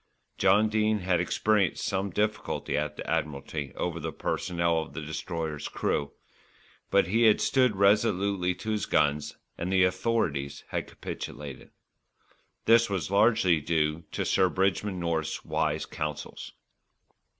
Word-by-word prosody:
John 105 +2 +5
Dene 110 -1 +1
had 90 -1 +1
experienced 105 +2 +1
some 95 +1 -1
difficulty 105 +3 -1
at 75 0 -1
the - - -6
Admiralty 70 -1 -2
over 85 -1 -2
the - - -4
personnel 85 -1 0
of 80 - -9
the 80 - -5
Destroyer's 80 0 -4
crew; 70 -1 -1 0.8
but 100 -1 +4
he 115 +6 +2
had 110 -2 +5
stood 125 -5 +3
resolutely 100 -2 +2
to 110 +5 -4
his 105 -1 -1
guns, 75 0 +1 0.2
and 90 +2 -2
the 95 -1 +4
Authorities 90 -7 0
had - - -3
capitulated. 70 -2 -7 1.0
This 115 0 +5
was 95 -2 -2
largely 100 -6 +4
due 80 +1 0
to - - -1
Sir 95 - +3
Bridgman 95 +1 0
North's 85 -2 -2
wise - - 0
counsels. 75 -1 -5
90 Hz, 135 wpm, -28 LUFS, 80-105 Hz, 1.0 s, John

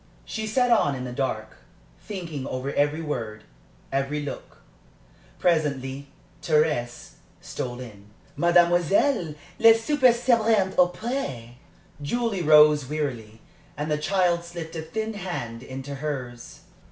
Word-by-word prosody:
She 220 0 -4
sat 245 +3 +2
on 145 -11 +3
in 130 - -5
the 125 - -5
dark, 120 -4 -3 0.4
thinking 165 -9 -6
over 130 +2 -4
every 145 +3 +1
word, 110 -8 -4 0.5
every 135 +2 -1
look. 145 - -8 0.8
Presently 140 -5 0 0.3
Thérèse 150 -6 0 0.3
stole 120 -1 -5
in. 105 -5 -11 0.3
"Mademoiselle, 175 - +3 0.2
le 225 0 +8
souper 255 +2 +3
sera 240 0 +2 0.2
bientôt 190 -3 +2
prêt." 180 - -4 0.5
Julie 220 +5 -1
rose 150 -3 +6
wearily, 120 -8 -4 0.4
and 150 +1 -3
the 150 - +2
child 175 0 +1
slipped 170 -1 -8
a 160 - -3
thin 220 +8 -4
hand 175 - -5
into 135 +2 -7
hers. 135 -4 -6
150 Hz, 120 wpm, -25 LUFS, 130-185 Hz, 0.8 s, le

